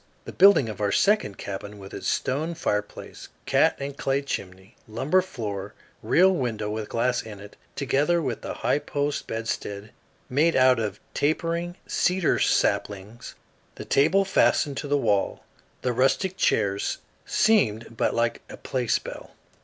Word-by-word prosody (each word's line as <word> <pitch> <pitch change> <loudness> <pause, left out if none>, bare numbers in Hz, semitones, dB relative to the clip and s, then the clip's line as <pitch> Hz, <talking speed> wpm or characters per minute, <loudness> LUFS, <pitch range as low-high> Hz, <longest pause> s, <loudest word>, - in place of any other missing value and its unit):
The - - -7
building 190 - +6
of 105 -1 -6
our 100 -1 +1
second 200 - +2
cabin 100 +1 -7
with 95 -1 -11
its - - -5
stone 155 +6 -1
fireplace, 105 -10 -4 0.2
cat - - +3
and 140 0 -5
clay 135 0 -1
chimney, 95 -7 -6
lumber 135 +12 +1
floor, 105 - -6 0.3
real 190 +3 +4
window 110 - -2
with 110 0 -4
glass 120 +2 0
in 105 -3 -10
it, 100 0 -12 0.2
together 145 +5 +1
with 130 -8 -3
the - - -5
high - - +3
post 145 0 -3
bedstead 110 -2 -4 0.4
made 150 +5 +2
out 130 -2 +5
of 105 -2 -3
tapering 170 +3 -1
cedar 180 -1 +1
saplings, 105 +4 -1 0.4
the - - -8
table 175 +8 +3
fastened 145 -6 +2
to 145 - -4
the 145 0 +2
wall, 105 -7 0 0.4
the 125 - 0
rustic 135 - +1
chairs, 100 - 0 0.3
seemed 115 - +2
but - - 0
like 115 0 0
a - - -9
play 125 -2 -3
spell. - - -3
125 Hz, 150 wpm, -25 LUFS, 105-155 Hz, 0.4 s, building